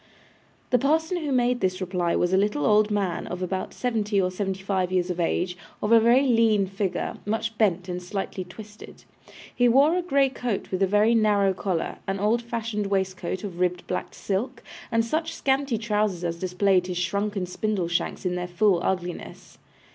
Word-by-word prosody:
The 250 Hz, -, +4 dB
parson 320 Hz, +6 st, +1 dB
who 305 Hz, -4 st, -3 dB
made 250 Hz, -1 st, +2 dB
this 185 Hz, -1 st, 0 dB
reply 180 Hz, -2 st, -1 dB
was 175 Hz, +1 st, +1 dB
a -, -, +5 dB
little 200 Hz, -7 st, +1 dB
old 210 Hz, 0 st, +4 dB
man, 200 Hz, -5 st, -1 dB
of 180 Hz, +1 st, -4 dB
about 185 Hz, +1 st, -3 dB
seventy 215 Hz, -4 st, -1 dB
or 185 Hz, -1 st, +1 dB
seventy 190 Hz, 0 st, -3 dB
five 190 Hz, -2 st, 0 dB
years 180 Hz, -1 st, +1 dB
of 180 Hz, -, -5 dB
age, 180 Hz, +1 st, 0 dB, 0.2 s
of 210 Hz, -, -1 dB
a 230 Hz, -, +8 dB
very 240 Hz, +4 st, +5 dB
lean 225 Hz, -5 st, +3 dB
figure, 195 Hz, 0 st, -3 dB
much 220 Hz, +1 st, -2 dB
bent 185 Hz, -4 st, +2 dB
and 180 Hz, 0 st, -4 dB
slightly 190 Hz, +1 st, -4 dB
twisted. 210 Hz, +4 st, -12 dB, 0.5 s
He 245 Hz, -1 st, +3 dB
wore 280 Hz, +7 st, +5 dB
a 360 Hz, -, +1 dB
grey 280 Hz, -6 st, +2 dB
coat 245 Hz, -5 st, -4 dB
with 185 Hz, 0 st, -2 dB
a 195 Hz, -, +4 dB
very 210 Hz, +4 st, +3 dB
narrow 205 Hz, -3 st, +3 dB
collar, 185 Hz, -3 st, -3 dB
an 195 Hz, 0 st, -2 dB
old 215 Hz, +4 st, +2 dB
fashioned 230 Hz, -3 st, -3 dB
waistcoat 190 Hz, -1 st, -2 dB
of 185 Hz, -4 st, -6 dB
ribbed 180 Hz, -1 st, 0 dB
black 180 Hz, -, -4 dB
silk, 235 Hz, +6 st, -3 dB, 0.3 s
and 230 Hz, 0 st, +2 dB
such 320 Hz, +7 st, -2 dB
scanty 270 Hz, -3 st, +1 dB
trousers 210 Hz, -4 st, -1 dB
as 170 Hz, -1 st, -2 dB
displayed 185 Hz, 0 st, +2 dB
his 180 Hz, -1 st, -3 dB
shrunken 200 Hz, +2 st, -1 dB
spindle 190 Hz, 0 st, -2 dB
shanks 175 Hz, +2 st, -2 dB
in 180 Hz, -, 0 dB
their 180 Hz, 0 st, -3 dB
full 180 Hz, 0 st, +2 dB
ugliness. 180 Hz, -2 st, -4 dB
200 Hz, 185 wpm, -25 LUFS, 180-230 Hz, 0.5 s, a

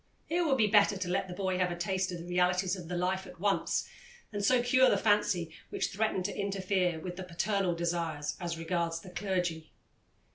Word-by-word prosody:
It 345 Hz, +2 st, +2 dB
would 280 Hz, -5 st, +2 dB
be 220 Hz, -, +4 dB
better 205 Hz, -1 st, +4 dB
to 185 Hz, -1 st, -3 dB
let 180 Hz, +1 st, 0 dB
the 180 Hz, -, -6 dB
boy 185 Hz, -1 st, -1 dB
have 180 Hz, -1 st, +2 dB
a 175 Hz, -, -3 dB
taste 185 Hz, +1 st, -1 dB
of 175 Hz, -, -4 dB
the 170 Hz, -, -8 dB
realities 180 Hz, +1 st, +1 dB
of 180 Hz, -3 st, -8 dB
the 175 Hz, +1 st, -3 dB
life 190 Hz, +2 st, -1 dB
at 180 Hz, -, -13 dB
once, 200 Hz, +1 st, +1 dB, 0.5 s
and 205 Hz, 0 st, -2 dB
so 245 Hz, +3 st, +4 dB
cure 260 Hz, +1 st, +5 dB
the -, -, +3 dB
fancy 200 Hz, -6 st, +2 dB, 0.2 s
which -, -, -1 dB
threatened 200 Hz, -2 st, -1 dB
to 205 Hz, -, -2 dB
interfere 190 Hz, -3 st, 0 dB
with 180 Hz, +2 st, -6 dB
the 190 Hz, -, -5 dB
paternal 185 Hz, +1 st, 0 dB
desires 165 Hz, -3 st, -2 dB
as 170 Hz, -1 st, -3 dB
regards 165 Hz, 0 st, -1 dB
the 185 Hz, -, -11 dB
clergy. 180 Hz, -4 st, -2 dB
185 Hz, 210 wpm, -31 LUFS, 175-200 Hz, 0.5 s, cure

